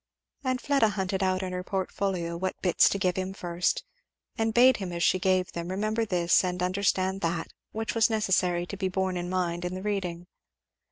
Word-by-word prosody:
And 255 -1 0
Fleda 275 -6 +3
hunted 190 -1 -2
out 185 0 +1
in 185 -1 -4
her 180 0 -3
portfolio 185 -2 -2
what 185 +2 -3
bits 180 -3 +5
to - - -1
give 185 -2 0
him 190 +1 -3
first, 175 -1 -1 0.5
and 225 0 0
bade 245 +2 +6
him 190 -3 -5
as 170 0 -2
she 185 - +3
gave 185 -1 +1
them 170 0 -5
remember 215 +4 -1
this 175 -3 +3
and 180 -1 -2
understand 190 0 0
that, 165 0 -2 0.2
which 220 0 -3
was 225 0 +4
necessary 185 -5 +1
to 200 - -6
be 190 -1 -1
borne 190 0 -1
in 175 0 -3
mind 175 -2 -1
in 180 +1 -3
the 185 - -6
reading. 185 -4 -2
185 Hz, 200 wpm, -28 LUFS, 180-200 Hz, 0.5 s, bade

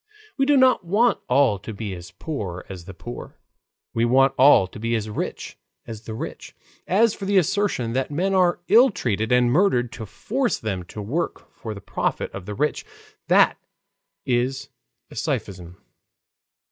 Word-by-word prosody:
We 270 -1 +1
do 290 -1 +5
not 260 -5 +4
want 210 +7 +2
all 125 -6 +3
to 110 - -8
be 100 -2 -5
as 85 -1 -9
poor 100 - -6
as 90 -3 -8
the 95 - -9
poor; 120 +6 -9 0.6
we 115 - +1
want 130 +3 +4
all 130 -7 +6
to 95 - -11
be 115 +1 -1
as 110 -1 -3
rich - - -5 0.3
as 110 -1 -9
the 110 - -6
rich. - - -7 0.3
As 210 +4 +3
for 195 - -7
the 200 0 +2
assertion 185 - +1
that 130 +1 -1
men 180 +7 0
are 180 -2 +2
ill 245 +4 +7
treated 110 - -2
and 125 -1 +4
murdered 125 - +2
to 110 - -8
force 235 - -1
them 100 -4 -3
to 105 +4 -8
work 145 +12 -4
for 110 -2 -7
the 100 - -9
profit - - -2
of 95 -2 -8
the 105 - -5
rich, 150 +5 -1 0.4
that - - +4 0.7
is 130 +2 -1 0.4
a - - -11
sophism. 90 -2 -4
125 Hz, 170 wpm, -23 LUFS, -, 0.7 s, ill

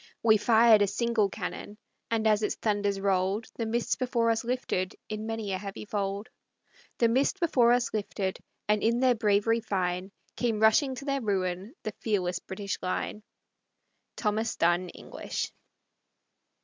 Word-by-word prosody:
We 220 -1 +6
fired 225 0 +6
a 205 - +4
single 220 0 +1
cannon, 205 +1 -6 0.3
And 225 -1 0
as 215 -1 +4
its 210 - 0
thunders 205 -2 0
rolled, 195 +2 +1
The 230 - -2
mist 235 +1 -1
before 240 -3 +1
us 225 +1 -1
lifted 235 -7 -2
In 215 +1 -4
many 225 -3 -3
a 185 - -2
heavy 200 +1 -7
fold. 200 +1 -3 0.7
The 235 - +4
mist 265 +11 +1
before 255 -9 +4
us 245 0 +2
lifted, 200 -2 -2 0.3
And 210 0 +2
in 235 +2 +2
their 255 -1 +4
bravery 220 0 +2
fine 185 -2 -2 0.2
Came 230 -3 0
rushing 260 +5 +4
to 275 - -8
their 275 -1 0
ruin 195 - -2
The 215 - -4
fearless 180 -5 0
British 195 +1 -5
line. 185 +3 -3 0.9
Thomas 215 +1 -1
Dunn 175 +2 +2
English. - - -5
215 Hz, 150 wpm, -28 LUFS, 195-230 Hz, 0.9 s, We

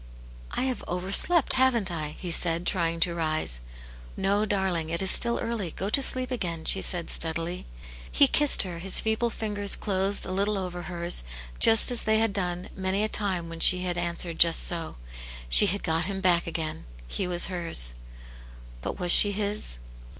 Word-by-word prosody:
" - - -19
I - - 0
have 260 -2 -4
overslept, 195 - +2
haven't 245 -7 +1
I? 155 -3 -6
" - - -18
he 180 - -6
said, 170 0 0
trying 170 -3 -1
to 175 - +1
rise. 155 - -3 0.3
'* - - -19
No, 205 +2 0
darling; 190 -6 -2
it 170 +1 -3
Is 190 - +3
still 235 0 +2
early, 230 -6 -4
go 190 +5 -6
to 275 - +1
sleep 255 -1 +1
again," 170 -9 -4
she 195 - 0
said, 175 -2 0
steadily. 165 +2 -1 0.4
He 285 - +5
kissed 295 +1 +5
her, 175 -3 -8
his 190 +2 0
feeble 220 +2 -1
fingers 205 -2 -2
closed 195 0 +1
a - - -6
little 200 +2 -1
over 180 -2 -6
hers, 175 - -3 0.4
just 225 +2 +5
as 245 - +1
they 220 0 0
had 225 -2 0
done 180 -2 -3
many 190 +2 -2
a - - 0
time 190 -6 -2
when 165 0 -9
she 180 +2 +5
had 180 -1 -3
answered 170 -1 -4
just 165 -1 +3
so; 165 -2 -4 0.5
she - - +6
had 200 +3 -2
got 165 0 -1
him 195 0 -4
back 175 -3 +1
again; 160 - -6 0.2
he 185 - -4
was 175 -1 +3
hers. 170 - -2 0.9
But - - -6
was 180 -2 +1
she 205 - +8
his 205 - -2
180 Hz, 190 wpm, -25 LUFS, 170-205 Hz, 0.9 s, she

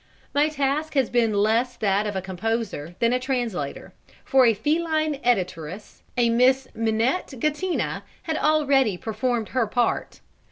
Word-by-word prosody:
My 290 +2 +3
task 300 +1 -1
has 265 -4 +2
been 235 -2 +2
less 220 +5 +1
that 205 0 +1
of 205 - -4
a 190 - -2
composer 190 -4 -3
than 235 +1 +2
a 250 - +2
translator, 240 - -3 0.3
for 265 -2 +5
a 225 - +4
feline 310 +1 0
editoress, 185 -5 -2 0.2
a 235 -1 +3
Miss 255 +2 +3
Minette 230 +7 0
Gattina, 305 +7 -1 0.2
had 320 - -2
already 280 -9 +3
performed 225 +2 -2
her 250 -4 0
part. 240 +2 -1
240 Hz, 145 wpm, -24 LUFS, 215-275 Hz, 0.3 s, for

